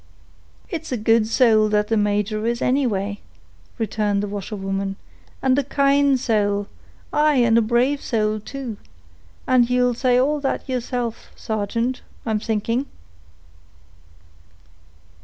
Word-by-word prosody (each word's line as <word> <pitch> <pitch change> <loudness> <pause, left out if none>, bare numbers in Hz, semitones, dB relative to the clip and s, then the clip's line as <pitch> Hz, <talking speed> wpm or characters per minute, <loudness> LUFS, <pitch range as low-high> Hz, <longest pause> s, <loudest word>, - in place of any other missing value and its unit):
"It's 335 -7 -6
a 250 - 0
good 225 0 +3
sowl 220 -2 +4
that 210 0 +1
the 225 - +2
major 210 0 0
is, 235 0 0
anyway," 205 -8 0 0.6
returned 210 -2 0
the - - -2
washerwoman; 195 -1 -4 0.5
"and 265 +1 +3
a - - 0
kind 280 0 +3
sowl—aye, 220 +7 -1
and 235 -3 +4
a 230 - +5
brave 245 +5 +1
sowl 215 -2 0
too; 250 -1 -7 0.7
and 250 -2 +3
ye'll 250 0 +2
say 250 +1 +2
all 290 +4 +2
that 275 -1 -2
yeerself, 245 -2 -3
sargeant, 230 +4 -2 0.2
I'm 220 -2 0
thinking." 230 +5 -1
230 Hz, 120 wpm, -22 LUFS, 210-255 Hz, 0.7 s, a